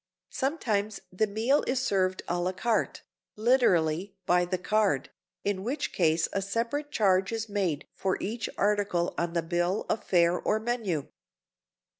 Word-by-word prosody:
Sometimes 215 -8 -1
the 215 +4 +1
meal 225 +8 +2
is 255 0 +1
served 185 -6 0
a 175 - -1
la 180 +1 -1
carte 225 +4 -1 0.3
(literally, 195 -6 +2
by 180 0 +3
the 185 +1 -1
card), 200 -5 +1 0.3
in 200 -2 -1
which 280 +6 -2
case 160 -2 +2
a 195 - 0
separate 230 +9 -2
charge 195 -5 +2
is 225 0 -3
made 190 -8 -1
for 190 -1 -1
each 225 +3 -3
article 200 -4 +1
on 170 0 -2
the 170 -1 0
bill 175 +4 0
of 215 - -1
fare 175 -1 +3
or 215 - +1
menu. 220 - -2
200 Hz, 150 wpm, -28 LUFS, 175-225 Hz, 0.3 s, by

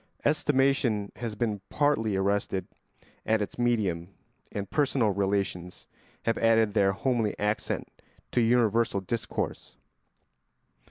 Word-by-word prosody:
Estimation 135 -8 +2
has 115 -3 -4
been 105 -3 -1
partly 115 -8 +1
arrested 95 -1 0 0.6
at 110 0 +2
its 105 +3 -4
medium 105 -9 +1 0.4
and 100 -1 -4
personal 135 -7 +2
relations 95 -2 -2 0.4
have 115 - 0
added 115 -2 +3
their 100 -2 +4
homely 115 -1 0
accent 105 +1 -1 0.4
to 120 - +2
universal 115 -3 +3
discourse. 105 +4 -4
110 Hz, 105 wpm, -28 LUFS, 100-120 Hz, 0.6 s, their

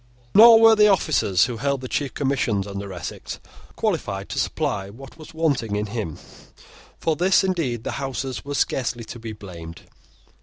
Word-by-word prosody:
Nor 225 +2 +9
were 225 0 +7
the 210 0 +6
officers 145 - +3
who 120 -2 -5
held 140 +2 -1
the 130 - -5
chief 140 +1 -3
commissions 130 -8 0
under 100 0 -6
Essex 90 -3 -7 0.4
qualified 100 0 -2
to - - -3
supply 95 0 -2
what 130 +6 -12
was 155 - -11
wanting 140 -10 0
in 105 0 -1
him. 105 -7 -5 0.8
For 160 - 0
this, 185 +4 +3
indeed, 160 - -1
the - - -4
Houses 135 -1 -4
are 145 0 -5
scarcely 120 -4 -1
to 120 +2 -9
be 115 -1 -7
blamed. 85 -5 -10
125 Hz, 165 wpm, -23 LUFS, 100-155 Hz, 0.8 s, Nor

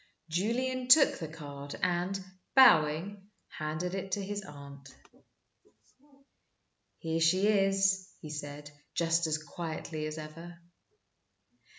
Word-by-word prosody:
Julian 250 +9 -1
took 275 +3 +6
the 160 - -4
card, 145 -2 -8
and, 180 +2 0 0.4
bowing, 195 - +5 0.2
handed 155 +4 -4
it 190 0 -4
to 200 - -1
his 205 +1 -4
aunt. 140 -4 -11 2.1
"Here 165 0 -2
she 185 +4 +4
is," 195 -2 +2
he 155 - -9
said, 145 -1 -7 0.2
just 165 0 +2
as 155 -1 0
quietly 155 0 -5
as 155 0 -6
ever. 165 +3 -9
170 Hz, 105 wpm, -31 LUFS, 155-195 Hz, 2.1 s, took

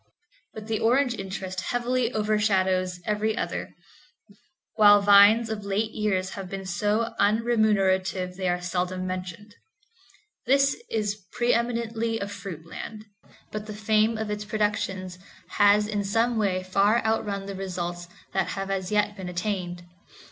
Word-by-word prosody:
But 215 -1 -7
the 220 -1 -2
orange 245 +3 +3
interest 190 -2 -5
heavily 245 +2 0
overshadows 190 -4 +1
every 215 +1 0
other, - - -4 1.0
while 205 -1 +7
vines 205 +3 +6
have 220 -1 -3
of 200 - -11
late 210 +3 -1
years 195 -4 -1 0.2
been 195 0 -6
so 210 +5 0
unremunerative 200 -4 +2
they 185 -1 -1
are 175 0 0
seldom 180 +1 -2
mentioned. 185 +3 -6 0.9
This 275 +1 +4
is 210 -2 -2
pre 240 0 +2
eminently 230 -1 -1
a 200 - -3
fruit 190 -5 -8
land, 215 +5 -8 0.5
but 215 0 -5
the 210 - -6
fame 215 +1 +2
of 220 -1 -3
its 210 0 -3
productions 205 -4 -2 0.3
has 205 0 +4
in 205 -1 -1
some 225 +4 +1
way 195 -4 0
far 200 +5 +2
outrun 210 -3 -1
the 200 - -5
results 175 -2 -5 0.3
that 190 - +1
have 195 0 -3
as 190 -1 -2
yet 210 0 +1
been 190 -3 -6
attained. 180 -1 -3
205 Hz, 140 wpm, -26 LUFS, 185-220 Hz, 1.0 s, while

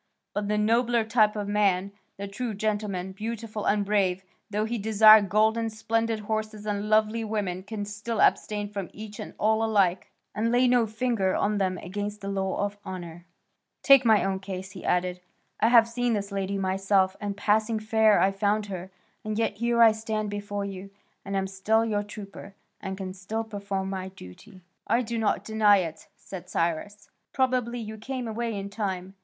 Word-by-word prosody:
But 205 0 -2
the 210 0 0
nobler 230 +2 +2
type 220 -1 +3
of 205 -1 -3
man, 200 -2 +1 0.3
the 200 +1 -5
true 215 +2 -4
gentleman, 205 -3 -2
beautiful 220 +1 -5
and 205 0 +2
brave, 190 -2 +1 0.3
though 210 +1 -1
he 230 +1 -3
desire 215 +1 +7
gold 215 +3 +2
and 225 -1 -2
splendid 225 0 -1
horses 215 0 -3
and 205 0 -2
lovely 215 +1 +2
women, 205 -4 -2
can 205 +1 -5
still 210 +2 -4
abstain 210 -1 +2
from 200 -3 -5
each 210 0 -9
and - - -7
all 220 +1 +2
alike, 200 -5 +2 0.2
and 225 +2 0
lay 250 +1 +4
no 245 -2 +3
finger 220 -4 0
on 210 0 0
them 185 -1 0
against 205 +4 -5
the 200 - -4
law 195 0 -1
of 205 0 -6
honour. 175 -2 -8 0.6
Take 275 -1 +7
my 220 -4 +4
own 190 -1 -1
case," 190 -1 -6
he 190 - -10
added, 180 0 0 0.4
"I 220 - +4
have 230 -1 +6
seen 240 0 0
this 200 -1 -3
lady 195 0 -2
myself, 190 0 +1
and 200 -1 -3
passing 215 +2 +1
fair 220 0 +3
I 195 - +3
found 205 +2 0
her, 185 0 -6 0.3
and 215 0 -3
yet 225 -2 0
here 235 +1 +3
I 225 - +8
stand 215 -1 -3
before 205 0 -4
you, 195 0 -7 0.3
and 195 0 -3
am 190 - 0
still 205 +4 +1
your 210 -2 0
trooper 200 -1 -10 0.3
and 190 -1 -5
can 190 -1 -5
still 205 +4 -4
perform 200 -3 -4
my 190 -1 -4
duty." 185 - -13 0.3
"I 235 +3 +2
do 230 0 -3
not 215 -2 0
deny 215 -2 +4
it," 165 -4 -4
said 180 -2 -10
Cyrus; 180 +6 -2 0.2
"probably 255 -2 +1
you 220 -2 -6
came 255 +1 -4
away 225 -1 -3
in 200 0 -5
time. 190 -3 -3
210 Hz, 185 wpm, -27 LUFS, 195-220 Hz, 0.6 s, I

